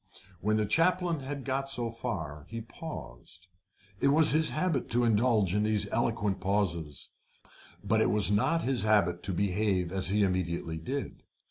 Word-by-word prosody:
When 110 +2 +1
the 110 - +1
chaplain 170 - +1
had 135 0 -6
got 135 0 -2
so 120 -4 -2
far 80 - -5
he 115 - -5
paused. 110 - -9 0.5
It - - +2
was 150 +2 +5
his 155 +1 +3
habit 155 -4 -1
to 120 +1 +1
indulge 110 -4 +2
in 105 - +2
these 105 -1 +1
eloquent 105 -4 0
pauses, 85 -7 -2 0.7
but - - +2
it - - +3
was 105 -1 +2
not 165 +11 +2
his 130 -4 +1
habit 100 -5 +2
to 95 - -2
behave 95 -1 0
as 95 -1 0
he 105 +1 +2
immediately 85 -3 -1
did. 135 - -5
105 Hz, 160 wpm, -29 LUFS, 95-135 Hz, 0.7 s, was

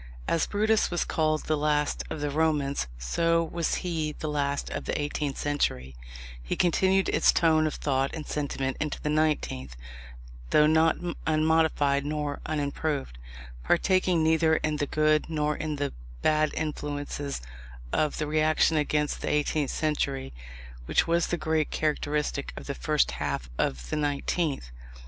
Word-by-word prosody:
As 165 - +1
Brutus 215 +1 +2
was 175 - -1
called 155 -1 0
the 155 - 0
last 150 0 0
of 150 - -5
the 145 -1 -1
Romans, 150 - +1
so 165 - +1
was 165 0 -1
he 160 -3 -1
the 155 - -6
last 140 -1 -1
of - - -4
the - - -1
eighteenth 145 -1 -2
century: 65 - -1 0.5
he - - -3
continued 190 +2 +3
its - - +4
tone 160 -2 +3
of 155 - -3
thought 135 -1 0
and 155 -2 -6
sentiment 135 -2 -2
into 155 -2 -2
the 150 - -2
nineteenth 150 - 0 0.7
(though 150 - +5
not 160 +1 +4 0.3
unmodified 155 -3 +2
nor 150 -1 -3
unimproved), 145 - -2 0.4
partaking 185 -1 +2
neither 160 0 +4
in 155 -1 -1
the 145 -1 -1
good 155 +1 +2
nor 150 -1 0
in 155 -1 -3
the 145 -1 -2 0.3
bad 155 0 +3
influences 145 -2 -3 0.5
of 155 -1 +1
the 155 - -1
reaction 155 +1 +2
against 150 0 0
the - - -2
eighteenth 150 -1 +1
century, 140 - -1 0.5
which - - +3
was 170 0 +2
the 175 - -1
great 160 -2 0
characteristic 150 -1 -1
of - - -7
the - - -3
first - - +1
half - - -3
of 60 -2 -1
the - - 0
nineteenth. 145 - -1
150 Hz, 150 wpm, -27 LUFS, 145-160 Hz, 0.7 s, though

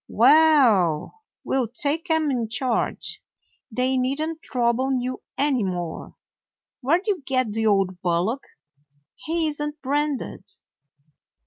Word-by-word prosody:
Well, 255 - +4 0.2
we - - -2
'll 255 -3 +1
take 295 - 0
'em 320 -2 +2
in 235 -4 -2
charge. 235 +1 -2 0.5
They 255 +3 0
need 260 +3 0
n't 320 +1 -3
trouble 255 +1 0
you 255 +1 -4 0.2
any 270 -4 +2
more. 175 -3 -4 0.6
Where 285 +5 +2
'd 365 - -9
you 405 -7 0
get 255 -4 0
the 220 0 0
old 195 -3 +1
bullock? 185 +9 0 0.7
He 330 0 -2
isn't 295 0 -4
branded." 290 +1 -2
260 Hz, 125 wpm, -24 LUFS, 225-295 Hz, 0.7 s, Well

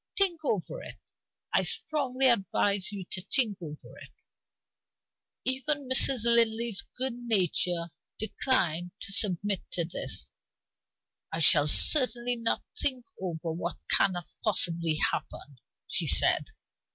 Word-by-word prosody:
Think 375 -4 +2
over 250 - -3
it; - - -10 0.6
I - - +3
strongly 270 -4 -2
advise 200 -3 +1
you 195 -3 -7
to 185 - -2
think 210 -1 -1
over 150 -3 -11
it." - - -13 1.4
Even 270 +2 0
Mrs. 260 -2 +4
Linley's 230 -2 +4 0.2
good 260 0 -2
nature 175 -4 +1 0.3
declined 180 -7 -1
to - - -5
submit 195 -1 +1
to 170 - +1
this. 130 - -6 1.0
"I 160 - -4
shall 150 -2 +5
certainly 245 - +4
not 230 -1 -2 0.2
think 255 -4 -1 0.2
over 170 -3 -5
what 170 +2 -5
cannot 175 -3 +2 0.2
possibly 170 -6 +1
happen," 145 -3 -4 0.3
she - - -2
said. - - +3
205 Hz, 115 wpm, -27 LUFS, 170-250 Hz, 1.4 s, shall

